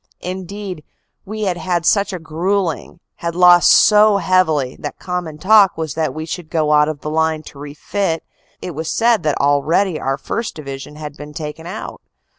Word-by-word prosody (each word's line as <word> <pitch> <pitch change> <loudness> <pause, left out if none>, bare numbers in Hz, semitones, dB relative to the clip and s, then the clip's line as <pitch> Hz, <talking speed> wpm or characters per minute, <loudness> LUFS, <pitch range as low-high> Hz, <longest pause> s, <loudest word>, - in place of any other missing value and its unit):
Indeed, 185 -1 -6 0.4
we 215 +2 -5
had 185 -3 -1
had 175 -2 -1
such 200 +1 +2
a 185 - -4
gruelling, 170 +1 -2 0.2
had 170 0 -4
lost 175 -1 +6
so 210 -1 +6
heavily, 160 -9 +1
that - - -6
common 180 -4 -5
talk 200 +3 +5
was 160 -3 -3
that 160 -1 -1
we 155 0 -6
should 165 0 -6
go 155 -3 0
out 150 0 +4
of 155 -2 -6
the 150 - -4
line 160 0 0
to 140 - -13
refit 160 +4 -3 0.4
it 180 - -4
was 160 +2 -4
said 230 -3 +2
that 150 -3 -1
already 155 +5 +1
our 135 +1 -1
1st. 225 +7 -4
Division 140 -1 -8
had 150 -1 -8
been 150 0 -10
taken 160 +1 -6
out. 200 +5 -7
165 Hz, 180 wpm, -18 LUFS, 150-190 Hz, 0.4 s, lost